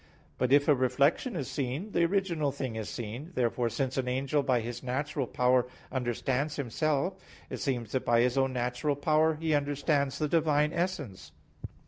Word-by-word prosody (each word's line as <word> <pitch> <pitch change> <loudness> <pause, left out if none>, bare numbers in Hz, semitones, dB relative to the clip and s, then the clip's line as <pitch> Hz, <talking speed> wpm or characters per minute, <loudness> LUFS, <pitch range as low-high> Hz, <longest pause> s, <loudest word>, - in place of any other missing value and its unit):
But 125 0 +1
if 145 +1 +5
a 150 - +7
reflection 140 - +1
is 135 - -3
seen, 140 +10 -3
the 170 - +3
original 170 -6 0
thing 130 -4 -4
is 110 -1 -4
seen. 120 +9 -6
Therefore 120 -1 +1
since 130 +2 -2
an 130 -1 0
angel 135 +3 +1
by 130 -3 +2
his 120 +1 -5
natural 135 +1 -2
power 125 +1 +2 0.2
understands 130 +3 -1
himself, 155 +7 -1 0.3
it - - -3
seems 120 -6 -2
that 130 - -1
by 120 0 +3
his 125 +1 +2
own 135 -1 +2
natural 125 +3 -1
power 155 +2 +2
he 160 0 -1
understands 145 -1 +1
the 155 - 0
Divine 150 -1 +2
essence. 170 - -3
140 Hz, 170 wpm, -29 LUFS, 125-150 Hz, 0.3 s, a